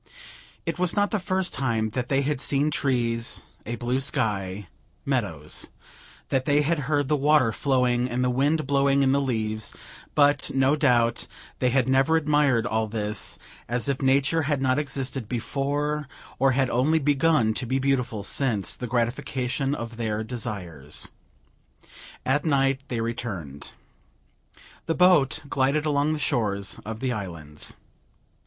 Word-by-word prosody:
It 165 Hz, 0 st, -3 dB
was 180 Hz, -1 st, +1 dB
not 205 Hz, 0 st, +2 dB
the 215 Hz, -, +1 dB
first 185 Hz, -1 st, -1 dB
time 115 Hz, -5 st, 0 dB
that 125 Hz, +2 st, -3 dB
they 135 Hz, 0 st, +2 dB
had 145 Hz, -1 st, -1 dB
seen 145 Hz, +2 st, +2 dB
trees, 120 Hz, -5 st, 0 dB, 0.2 s
a 120 Hz, -, -2 dB
blue 120 Hz, +2 st, -1 dB
sky, 105 Hz, -8 st, -1 dB, 0.4 s
meadows; -, -, -1 dB, 0.6 s
that 130 Hz, -1 st, 0 dB
they 145 Hz, 0 st, +3 dB
had 165 Hz, +2 st, +1 dB
heard 145 Hz, -2 st, +2 dB
the 150 Hz, -, +2 dB
water 145 Hz, -4 st, +4 dB
flowing 125 Hz, -1 st, +1 dB
and 125 Hz, +1 st, -1 dB
the 125 Hz, -, +2 dB
wind 145 Hz, +5 st, +1 dB
blowing 140 Hz, 0 st, +3 dB
in 135 Hz, -, +3 dB
the 140 Hz, +1 st, +3 dB
leaves; 110 Hz, -5 st, -2 dB, 0.4 s
but, 145 Hz, -1 st, +3 dB
no 135 Hz, +2 st, +4 dB
doubt, 120 Hz, -6 st, +2 dB, 0.3 s
they 125 Hz, -, +2 dB
had 130 Hz, 0 st, +2 dB
never 135 Hz, +5 st, +4 dB
admired 145 Hz, -6 st, +2 dB
all 110 Hz, -1 st, 0 dB
this, 105 Hz, -1 st, -2 dB, 0.3 s
as 120 Hz, +3 st, 0 dB
if 140 Hz, -1 st, -1 dB
Nature 140 Hz, +4 st, +3 dB
had 145 Hz, -1 st, 0 dB
not 130 Hz, +1 st, +2 dB
existed 135 Hz, -4 st, -3 dB
before, 145 Hz, +4 st, -1 dB, 0.3 s
or 135 Hz, 0 st, +4 dB
had 130 Hz, -1 st, +1 dB
only 135 Hz, +7 st, +3 dB
begun 145 Hz, -5 st, +3 dB
to 125 Hz, -, -4 dB
be 130 Hz, +3 st, +1 dB
beautiful 130 Hz, -6 st, 0 dB
since 115 Hz, -8 st, 0 dB
the 125 Hz, -, -6 dB
gratification 125 Hz, +3 st, -1 dB
of 115 Hz, -2 st, -6 dB
their 110 Hz, -2 st, -2 dB
desires. 95 Hz, -, -5 dB, 1.1 s
At 145 Hz, +3 st, +2 dB
night 135 Hz, -3 st, +2 dB
they 120 Hz, -3 st, -2 dB
returned. 105 Hz, -, -5 dB, 1.1 s
The 165 Hz, -, +1 dB
boat 180 Hz, -9 st, +4 dB
glided 140 Hz, +3 st, +1 dB
along 150 Hz, 0 st, +2 dB
the -, -, -2 dB
shores 105 Hz, -9 st, -1 dB
of 110 Hz, +1 st, -6 dB
the 130 Hz, -2 st, 0 dB
islands. 85 Hz, -8 st, -6 dB
130 Hz, 150 wpm, -25 LUFS, 115-145 Hz, 1.1 s, water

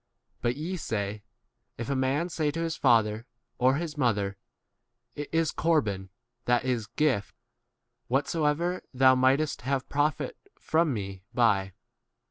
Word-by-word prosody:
But 120 Hz, +1 st, 0 dB
ye 175 Hz, +5 st, -3 dB
say, 105 Hz, -, -3 dB, 0.6 s
If 115 Hz, -, -4 dB
a 140 Hz, -, 0 dB
man 135 Hz, +6 st, +1 dB
say 155 Hz, -3 st, 0 dB
to 165 Hz, +3 st, -3 dB
his 165 Hz, -1 st, -1 dB
father 115 Hz, -3 st, +2 dB, 0.3 s
or 130 Hz, +2 st, +4 dB
his 155 Hz, -1 st, -4 dB
mother, 100 Hz, -6 st, +1 dB, 0.8 s
[It 145 Hz, -, -6 dB
is] 160 Hz, -1 st, +2 dB
corban 105 Hz, -, 0 dB, 0.4 s
(that 120 Hz, 0 st, +2 dB
is, 120 Hz, -5 st, -1 dB
gift), 120 Hz, -4 st, 0 dB, 0.7 s
whatsoever 150 Hz, +6 st, 0 dB
thou 130 Hz, 0 st, +6 dB
mightest 130 Hz, +4 st, +2 dB
12 125 Hz, -, -6 dB
have 135 Hz, -2 st, -1 dB
profit 150 Hz, -, 0 dB, 0.2 s
from 160 Hz, -1 st, +1 dB
me 100 Hz, -5 st, -4 dB
by. 100 Hz, -6 st, +2 dB
130 Hz, 135 wpm, -28 LUFS, 115-155 Hz, 0.8 s, thou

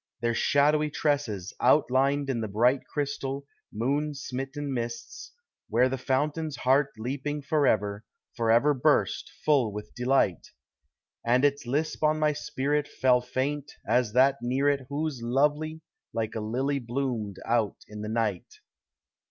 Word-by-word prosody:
Their 120 Hz, 0 st, +1 dB
shadowy 150 Hz, +4 st, +3 dB
tresses 140 Hz, -, -1 dB
outlined 140 Hz, +1 st, +3 dB
in 125 Hz, -4 st, -1 dB
the 110 Hz, -, -2 dB
bright 120 Hz, +6 st, +2 dB
Crystal, 140 Hz, -1 st, -3 dB, 0.3 s
moon 145 Hz, +7 st, -1 dB
smitten 135 Hz, +1 st, -4 dB
mists, 130 Hz, -, -5 dB, 0.4 s
where 120 Hz, +4 st, +3 dB
the 135 Hz, -, -2 dB
fountain's 145 Hz, +4 st, -1 dB
heart 135 Hz, +2 st, +2 dB
leaping 140 Hz, +5 st, -3 dB
Forever, 110 Hz, -9 st, +1 dB, 0.3 s
forever 120 Hz, +5 st, +3 dB
burst, 130 Hz, -, +1 dB, 0.2 s
full 135 Hz, -8 st, +3 dB
with 105 Hz, +1 st, -8 dB
delight; 125 Hz, -, +1 dB, 0.8 s
And 125 Hz, +4 st, +3 dB
its 140 Hz, -2 st, 0 dB
lisp 155 Hz, +5 st, -1 dB
on 155 Hz, 0 st, +3 dB
my 155 Hz, -1 st, +2 dB
spirit 145 Hz, +1 st, -1 dB
Fell 125 Hz, -1 st, +2 dB
faint 140 Hz, +3 st, -3 dB
as 120 Hz, -4 st, +2 dB
that 135 Hz, +2 st, +5 dB
near 130 Hz, +4 st, 0 dB
it 140 Hz, -3 st, -1 dB
Whose 145 Hz, -3 st, -3 dB
love 135 Hz, +5 st, +2 dB, 0.6 s
like 110 Hz, -1 st, -2 dB
a 110 Hz, -, -3 dB
lily 130 Hz, +6 st, -1 dB
bloomed 120 Hz, -5 st, -3 dB
out 115 Hz, -3 st, +1 dB
in 105 Hz, 0 st, -8 dB
the 105 Hz, -, -4 dB
night. 110 Hz, -5 st, -2 dB
135 Hz, 135 wpm, -27 LUFS, 115-145 Hz, 0.8 s, that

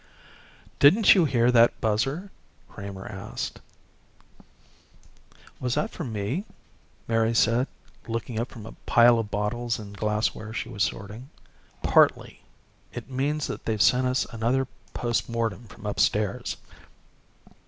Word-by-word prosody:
"Didn't 195 Hz, +10 st, +7 dB
you 180 Hz, -5 st, +4 dB
hear 125 Hz, -3 st, +3 dB
that 120 Hz, -1 st, +5 dB
buzzer?" 135 Hz, -, -1 dB, 0.4 s
Kramer 100 Hz, -1 st, -8 dB
asked. 100 Hz, -2 st, -6 dB, 2.0 s
"Was 125 Hz, -1 st, -1 dB
that 220 Hz, -, -1 dB
for 170 Hz, -, -6 dB
me?" 115 Hz, -, -3 dB, 0.6 s
Mary 115 Hz, 0 st, +1 dB
said, 115 Hz, +4 st, +3 dB, 0.4 s
looking 115 Hz, 0 st, -3 dB
up 120 Hz, -, -2 dB
from 110 Hz, -4 st, -10 dB
a 115 Hz, -, -8 dB, 0.2 s
pile 120 Hz, 0 st, +6 dB
of 110 Hz, -2 st, -3 dB
bottles 115 Hz, +4 st, -1 dB
and 100 Hz, -2 st, -9 dB
glassware 110 Hz, +1 st, -1 dB
she 115 Hz, +1 st, -3 dB
was 105 Hz, -4 st, -6 dB
sorting. 105 Hz, +7 st, -5 dB, 0.5 s
"Partly. -, -, +3 dB, 0.5 s
It -, -, -8 dB
means 140 Hz, +3 st, -1 dB
they've 110 Hz, -1 st, -3 dB
sent 125 Hz, +4 st, +4 dB
us 125 Hz, 0 st, +1 dB
another 120 Hz, +4 st, 0 dB, 0.3 s
post 120 Hz, -2 st, -1 dB
mortem 115 Hz, 0 st, -2 dB
from 105 Hz, -, -13 dB
upstairs." 105 Hz, 0 st, 0 dB
115 Hz, 120 wpm, -26 LUFS, 105-125 Hz, 2.0 s, Didn't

